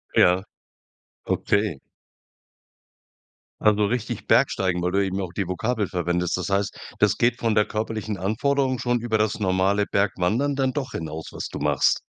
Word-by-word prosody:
Ja. 90 +2 +5 0.8
Okay. 100 -8 0 1.8
Also 105 0 +4
richtig 115 +1 -3
Bergsteigen? 90 -2 +2
Weil 90 - 0
du 100 0 +2
eben 95 +1 -2
auch 90 -2 -5
die 100 -4 -2
Vokabel 105 +3 -1
verwendest. 90 0 -1
Das 90 - -3
heißt, 100 +1 0 0.2
das - - +3
geht 120 +1 +2
von 115 -2 +1
der 105 - +4
körperlichen 110 -1 -3
Anforderung 130 +7 0
schon 120 -1 +1
über 115 -2 0
das 110 0 0
normale 95 +1 +2
Bergwandern 105 +9 0
dann 135 -1 +1
doch 135 -4 -3
hinaus, 80 0 -5
was - - -4
du - - -6
machst? - - +2
105 Hz, 155 wpm, -24 LUFS, 95-115 Hz, 1.8 s, Ja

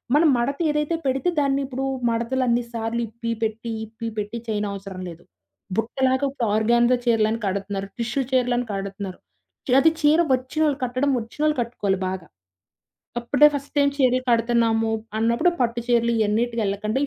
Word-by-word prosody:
మనం 310 +1 +5
మడత 275 +4 -1
ఏదైతే 300 +2 0
పెడితే 270 +6 +1
దాన్ని 275 -1 +1
ఇప్పుడు 265 0 -4 0.2
మడతలన్ని 240 +1 +1
సార్లు 230 +1 -2
ఇప్పి 230 +1 -5
పెట్టి 225 +1 -2
ఇప్పి 220 +1 -7
పెట్టి 210 +2 -3
చేయనవసరం 200 -3 -4
లేదు. 170 0 -12 0.5
బుట్టలాగా 260 +4 +1
ఇప్పుడు 250 -4 -2
ఆర్గాన్జా 235 +3 +3
చీరలని 225 -1 +2
కడుతున్నారు. 195 0 -3
టిష్యూ 235 +4 -1
చీరలని 245 -1 +1
కడుతున్నారు. 195 -1 -5 0.5
చి - - -1
అది 320 +3 +5
చీర 300 +2 +5
వచ్చినోళ్ళు 275 +3 0
కట్టడం 255 +3 0
వచ్చినోళ్ళు 295 +7 -1
కట్టుకోవాలి 205 -5 -1
బాగా, 185 -2 -6 0.9
అప్పుడే 275 +5 +5
ఫస్ట్ 280 0 -6
టైమ్ 280 -1 +4
చీరలు 255 -2 +3
కడుతున్నాము 230 -1 +2 0.3
అన్నప్పుడు 235 +10 +3
పట్టు 235 -1 0
చీరలు 235 -1 +3
ఇయన్నిటికి 225 +2 +1
ఎళ్ళకుండా 210 +4 -2
235 Hz, 140 wpm, -23 LUFS, 220-265 Hz, 0.9 s, మనం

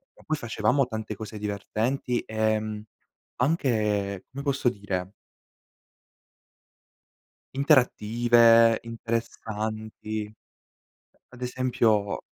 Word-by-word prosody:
Ma - - -19
poi 155 - 0
facevamo 120 +2 +1
tante 110 -2 -5
cose 110 +1 -8
divertenti, 110 +5 -2
ehm, 110 -1 -1 0.5
anche, 105 - 0
come 135 +2 -6
posso 140 -3 +1
dire 100 -3 -4 2.4
interattive, 120 -4 +5
interessanti. 110 -2 -4 1.0
Ad 125 0 -14
esempio, 120 -5 +1
110 Hz, 75 wpm, -26 LUFS, 105-125 Hz, 2.4 s, interattive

